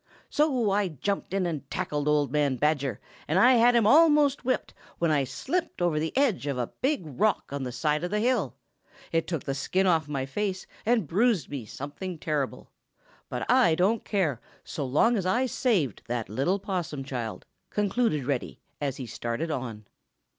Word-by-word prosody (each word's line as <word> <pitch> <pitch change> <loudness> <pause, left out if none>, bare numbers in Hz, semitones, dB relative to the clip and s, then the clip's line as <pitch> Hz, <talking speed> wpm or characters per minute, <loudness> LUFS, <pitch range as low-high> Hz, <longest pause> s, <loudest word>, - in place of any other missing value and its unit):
"So 260 -8 +2
I 200 0 +2
jumped 190 +5 -3
in 195 -1 0
and 150 -5 -4
tackled 150 -5 -2
old 150 -2 +2
man 145 -2 +2
Badger, 140 -4 0 0.3
and 160 - +1
I 245 +7 +7
had 240 0 +5
him 230 -3 +4
almost 295 +1 +5
whipped, 255 0 -1 0.2
when 170 -2 +1
I 145 -3 +2
slipped 340 - -3
over 175 -4 +1
the 160 +1 -1
edge 245 - +2
of 140 -2 -1
a 120 -2 -3
big 275 -5 +1
rock 155 - 0
on 140 - -3
the 125 -1 -3
side 150 +5 0
of 175 - -1
the 210 +2 0
hill. 250 +4 +1 0.6
It 165 0 0
took 165 -5 -3
the 135 - -2
skin 180 +8 0
off 165 -5 +2
my 140 -3 -2
face 190 +5 -3 0.2
and 230 -5 +3
bruised 200 - +1
me 130 -7 -5
something 160 - -6
terrible. 150 -4 -3 0.6
But - - -3
I 245 -11 +5
don't 200 +6 +2
care, 165 - 0 0.2
so 155 -4 -4
long 225 - +3
as 185 -2 -1
I 245 +8 +2
saved 210 - 0
that 120 -4 -3
little 135 - +1
Possum 180 -8 -3
child," 120 -5 -5 0.2
concluded 205 - 0
Reddy, 135 -2 -2 0.2
as 140 -2 -2
he 130 - -5
started 120 +7 -3
on. 115 -6 -5
165 Hz, 180 wpm, -27 LUFS, 140-210 Hz, 0.6 s, I